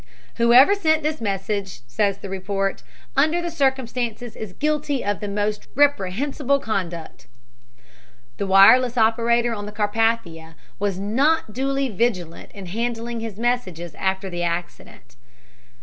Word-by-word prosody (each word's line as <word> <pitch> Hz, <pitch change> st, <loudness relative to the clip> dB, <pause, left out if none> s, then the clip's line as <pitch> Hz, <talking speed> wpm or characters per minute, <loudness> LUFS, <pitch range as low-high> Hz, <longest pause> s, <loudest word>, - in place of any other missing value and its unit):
"Whoever 245 Hz, +9 st, +6 dB
sent 315 Hz, -6 st, +1 dB
this 305 Hz, -2 st, -2 dB
message," 200 Hz, -, -3 dB
says 200 Hz, -, 0 dB
the 200 Hz, -, -8 dB
report, 195 Hz, +1 st, -2 dB, 0.3 s
"under 310 Hz, +5 st, +3 dB
the 345 Hz, 0 st, -3 dB
circumstances, 250 Hz, -5 st, -2 dB
is 215 Hz, -4 st, -7 dB
guilty 295 Hz, +1 st, -1 dB
of 205 Hz, 0 st, -1 dB
the 205 Hz, -, -5 dB
most 210 Hz, +1 st, -2 dB
reprehensible 280 Hz, +2 st, +1 dB
conduct." 180 Hz, -, -5 dB, 1.1 s
The 200 Hz, -, -2 dB
wireless 225 Hz, +6 st, +6 dB
operator 235 Hz, +1 st, +2 dB
on 205 Hz, -2 st, -5 dB
the -, -, -7 dB
Carpathia 210 Hz, -6 st, -1 dB, 0.2 s
was 200 Hz, -2 st, -1 dB
not 230 Hz, +6 st, +1 dB
duly 275 Hz, +2 st, -1 dB
vigilant 190 Hz, -6 st, -2 dB
in 200 Hz, -2 st, -9 dB
handling 230 Hz, +4 st, -3 dB
his 225 Hz, -3 st, -6 dB
messages 195 Hz, -9 st, -2 dB
after 190 Hz, +1 st, -2 dB
the 175 Hz, -2 st, -4 dB
accident. 170 Hz, -7 st, -5 dB
220 Hz, 130 wpm, -22 LUFS, 195-255 Hz, 1.1 s, Whoever